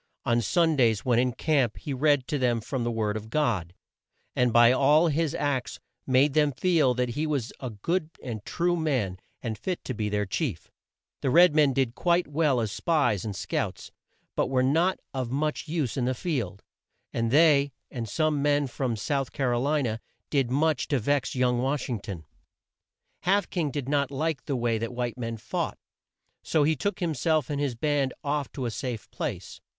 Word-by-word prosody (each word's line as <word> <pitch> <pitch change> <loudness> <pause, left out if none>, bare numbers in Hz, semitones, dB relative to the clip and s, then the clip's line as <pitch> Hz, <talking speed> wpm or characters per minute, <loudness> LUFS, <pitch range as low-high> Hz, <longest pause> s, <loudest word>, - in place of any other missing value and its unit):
On 120 0 +2
Sundays, 130 - +2
when 120 -2 +3
in 125 0 +2
camp, 135 -6 +1
he 145 - -5
read 145 -1 +2
to 145 - -1
them 120 -2 +2
from 130 +2 -3
the 120 - 0
word 110 -2 -1
of 110 0 -6
God, 105 - 0 0.6
and 125 -1 +3
by 120 +1 +7
all 150 +6 +4
his 160 +1 0
acts 140 -4 -2 0.3
made 135 +2 +4
them 150 -1 +3
feel 155 -4 +2
that 125 0 0
he 150 +6 -2
was 140 -6 -2
a 130 - -4
good 155 - -2
and 110 -5 -5
true 175 +7 0
man, 130 - -1 0.2
and 110 -3 -3
fit 180 +7 -3
to 130 - -3
be 105 -2 -2
their 105 0 0
chief. 105 - -3 0.5
The 135 - 0
red 170 +3 +6
men 150 -2 +4
did 130 -3 0
quite 175 +4 +1
well 145 -3 +2
as 110 -3 -2
spies 130 - +1
and 105 -3 -4
scouts, - - -3 0.4
but - - +1
were 130 -1 +2
not 165 +8 +2
of 130 -3 -2
much 150 +5 -2
use 155 -7 -1
in 125 - 0
the 130 +1 0
field, 120 - -3 0.5
and 115 -1 0
they, 145 0 +5 0.2
and 115 -4 -5
some 155 +2 +1
men 145 0 +2
from 130 -2 -2
South 135 +5 -2
Car 130 -4 0
o 120 - 0
li 145 +2 +1
na, 110 -3 -1 0.3
did 135 -5 +2
much 150 +1 +1
to 140 - +1
vex 135 +4 0
young 125 -1 +2
Wash 135 +2 -1
ing 120 -4 -2
ton. 95 -6 -7 0.9
Half 195 +1 +1
King 165 -5 0
did 140 -2 -4
not 140 -1 +1
like 145 +1 -2
the 140 - -1
way 120 -2 0
that 115 +2 -4
white 120 0 -3
men 115 -1 -3
fought, 110 - -3 0.6
so 155 - +1
he 155 +2 +3
took 200 +5 -2
him 165 -2 0
self 155 0 +1
and 145 0 -1
his 135 -4 -1
band 140 +1 0
off 145 -1 -1
to 130 - -4
a 120 - -1
safe 120 -3 -5
place. - - -5
135 Hz, 195 wpm, -27 LUFS, 120-150 Hz, 0.9 s, by